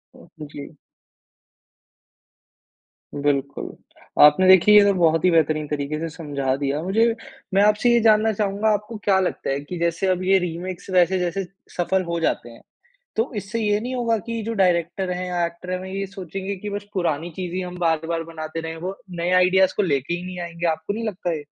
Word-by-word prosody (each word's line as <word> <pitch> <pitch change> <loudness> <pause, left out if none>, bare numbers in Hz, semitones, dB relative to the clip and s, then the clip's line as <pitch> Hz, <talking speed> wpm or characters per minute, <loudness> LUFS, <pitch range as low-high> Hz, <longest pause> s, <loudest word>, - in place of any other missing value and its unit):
आप - - -17 0.3
जी। 145 +2 -9 2.4
बिल्कुल, 140 -1 -2 0.5
आपने 150 +6 +6
देखिए 190 +3 +7
ये 205 - +8
तो 200 - +4
बहुत 165 0 +3
ही 180 - +5
बेहतरीन 155 -2 +2
तरीके 150 +1 -3
से 165 +1 -3
समझा 140 -5 -2
दिया 140 +2 -2
मुझे, 225 +5 +2 0.4
मैं 195 - +4
आपसे 210 +3 +3
ये 235 - +5
जानना 220 0 +4
चाहूँगा 205 +1 0
आपको 210 +2 -4
क्या 195 -2 +3
लगता 185 - -2
है 135 0 0
कि 160 +5 -7
जैसे 170 +2 0
अब 185 0 +1
ये 190 +1 +4
रीमेक 180 +1 -4
वैसे 185 +1 +4
जैसे 180 +2 -1 0.3
सफल 185 +2 +1
हो 170 -1 -3
जाते 140 -7 -1
हैं। 115 - -14 0.6
तो 225 +5 0
इससे 210 +3 -3
ये 210 -1 +2
नहीं 250 +3 -4
होगा 235 -2 +1
की 230 -1 -3
जो 230 - -3
डायरेक्टर 180 -1 +1
है 180 0 -3
या 175 -1 0
एक्टर 170 +2 -9
है 185 - -1
वे 190 0 -8
ये 195 - -2
सोचेंगे 195 +1 -6
की 205 +3 -6
बस 205 0 -5
पुरानी 170 -3 -1
चीज़ 180 -2 -4
ही 185 - -1
हम 180 -1 -6
बार-बार 165 -1 0
बनाते 160 0 -6
रहे 160 0 -6
वो 190 +1 -4
नए 175 0 -2
आईडियाज़ 185 +1 +4
को - - +2
लेके 140 -3 0
ही 175 - -4
नहीं 185 0 -7
आएँगे, 170 0 -4
आपको 160 +3 -1
नहीं 225 +1 -4
लगता 180 -4 -3
ये? 150 -2 -6
180 Hz, 195 wpm, -23 LUFS, 165-195 Hz, 2.4 s, ये